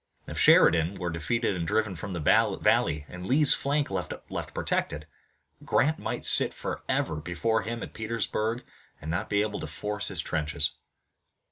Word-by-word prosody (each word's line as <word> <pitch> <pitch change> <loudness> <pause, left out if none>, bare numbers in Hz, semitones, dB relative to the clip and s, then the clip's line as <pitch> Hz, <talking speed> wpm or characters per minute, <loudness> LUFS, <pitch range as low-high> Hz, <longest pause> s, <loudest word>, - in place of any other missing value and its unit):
If - - -6
Sheridan 85 +3 +5
were 90 -3 -3
defeated 100 +7 -1
and 85 -2 -3
driven 110 +1 0
from 90 +4 -6
the 85 - -3
valley, 75 -1 +2
and 90 0 -9
Lee's 140 +8 +4
flank 145 -1 -1
left 90 -2 -3 0.4
protected, 75 +1 -2 0.6
Grant 155 +4 +2
might - - -4
sit - - +5
forever 80 - -2
before 85 +8 -1
him 115 +1 -5
at - - -8
Petersburg 110 +1 -2 0.4
and 80 +2 -5
not 90 +6 -2
be 100 0 +2
able 105 -1 -3
to - - -5
force 105 0 -3
his - - -3
trenches. 75 -1 -1
100 Hz, 155 wpm, -28 LUFS, 80-115 Hz, 0.6 s, Sheridan